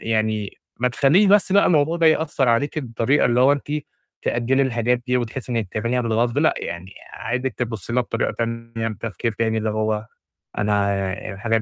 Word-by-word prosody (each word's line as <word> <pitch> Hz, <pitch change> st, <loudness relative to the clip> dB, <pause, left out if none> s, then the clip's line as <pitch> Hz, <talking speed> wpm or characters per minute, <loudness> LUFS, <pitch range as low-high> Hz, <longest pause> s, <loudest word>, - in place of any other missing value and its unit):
يعني 110 Hz, -2 st, -1 dB, 0.2 s
ما 125 Hz, -, +3 dB
تخليش 145 Hz, -, +4 dB
بس 195 Hz, -1 st, +4 dB
بقى 200 Hz, +1 st, +5 dB
الموضوع 160 Hz, 0 st, +3 dB
ده 165 Hz, -, +4 dB
يأثّر 155 Hz, -5 st, +2 dB
عليكِ 140 Hz, +7 st, +1 dB
بالطريقة 125 Hz, +2 st, +1 dB
اللي 120 Hz, 0 st, +2 dB
هو 135 Hz, +2 st, +6 dB
أنتِ 145 Hz, 0 st, -3 dB, 0.5 s
تأجلي 125 Hz, +3 st, +1 dB
الحاجات 120 Hz, -1 st, +1 dB
دي 125 Hz, 0 st, +2 dB
وتحسّي 125 Hz, +1 st, -4 dB
إنِك 115 Hz, -4 st, -1 dB
تعمليها 115 Hz, +3 st, 0 dB
بالغصب 115 Hz, 0 st, 0 dB
لأ، -, -, +3 dB
يعني 90 Hz, +3 st, -6 dB, 0.2 s
عايزِك 125 Hz, +2 st, -3 dB
تبصي 115 Hz, -2 st, -4 dB
لها 125 Hz, -, +3 dB
بطريقة 115 Hz, -1 st, -2 dB
تانية 115 Hz, -1 st, -3 dB
بتفكير 110 Hz, +1 st, -4 dB
تاني 110 Hz, +1 st, 0 dB
اللي 110 Hz, 0 st, -1 dB
هو 110 Hz, 0 st, -1 dB, 0.5 s
أنا، 100 Hz, -2 st, +1 dB, 0.2 s
الحاجات 110 Hz, +2 st, 0 dB
115 Hz, 170 wpm, -22 LUFS, 110-130 Hz, 0.5 s, هو